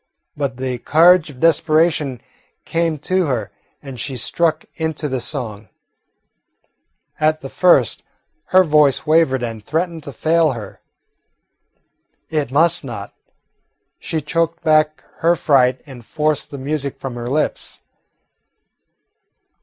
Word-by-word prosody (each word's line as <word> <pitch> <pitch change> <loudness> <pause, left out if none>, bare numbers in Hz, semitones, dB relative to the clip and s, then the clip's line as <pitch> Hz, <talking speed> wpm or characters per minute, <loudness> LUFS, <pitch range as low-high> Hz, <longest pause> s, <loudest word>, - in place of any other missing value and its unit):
But 140 -3 -3
the 130 -1 -3
courage 170 +4 +4
of 130 -3 -13
desperation 155 -4 +2 0.4
came 165 -1 -1
to 185 -2 +1
her, 125 -5 -2 0.3
and 135 -3 -9
she 130 +2 -4
struck 160 +6 0
into 160 -1 -3
the 130 -3 -3
song. 115 -5 -5 1.5
At 155 0 +1
the 135 - -7
first 180 +4 +3 0.4
her 185 0 +5
voice 150 -4 +3
wavered 155 -5 +3
and 115 -3 -5
threatened 165 - -2
to 140 - -6
fail 160 +1 +2
her. 110 -5 -9 1.5
It 150 -5 -1
must 155 +5 +3
not. 115 -7 -7 0.9
She 160 - -3
choked 165 +2 -1
back 155 -1 +2 0.2
her 170 +1 +3
fright 130 -5 +2
and 130 -5 -12
forced 150 +3 -1
the 140 - -8
music 140 0 -3
from 135 -2 -6
her 120 0 -5
lips. 150 +3 -2
150 Hz, 120 wpm, -19 LUFS, 130-160 Hz, 1.5 s, her